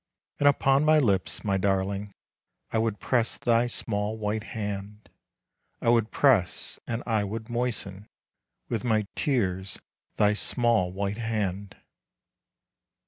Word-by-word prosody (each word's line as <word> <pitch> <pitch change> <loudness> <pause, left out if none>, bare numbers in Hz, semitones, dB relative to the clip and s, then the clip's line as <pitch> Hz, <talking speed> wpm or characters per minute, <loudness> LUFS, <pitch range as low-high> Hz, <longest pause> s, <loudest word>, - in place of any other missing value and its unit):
And 145 - +4
upon 135 0 +4
my 155 0 +5
lips, 95 - +1
my 100 -2 +1
darling, 100 +1 -1 0.6
I 110 - +2
would 110 -2 -1
press 120 -3 0
thy 120 0 +2
small 105 -2 -2
white 110 0 -2
hand. 105 -1 -6 0.7
I - - 0
would 115 -2 +3
press 115 -11 +2
and 115 0 -3
I 110 -3 +1
would 110 +3 -5
moisten 110 -5 -3 0.6
With 115 -3 -2
my 110 -3 +1
tears 95 - -1 0.4
thy 105 0 +4
small, 115 -4 +1
white 100 +2 -3
hand. 105 -4 -3
110 Hz, 125 wpm, -27 LUFS, 100-120 Hz, 0.7 s, my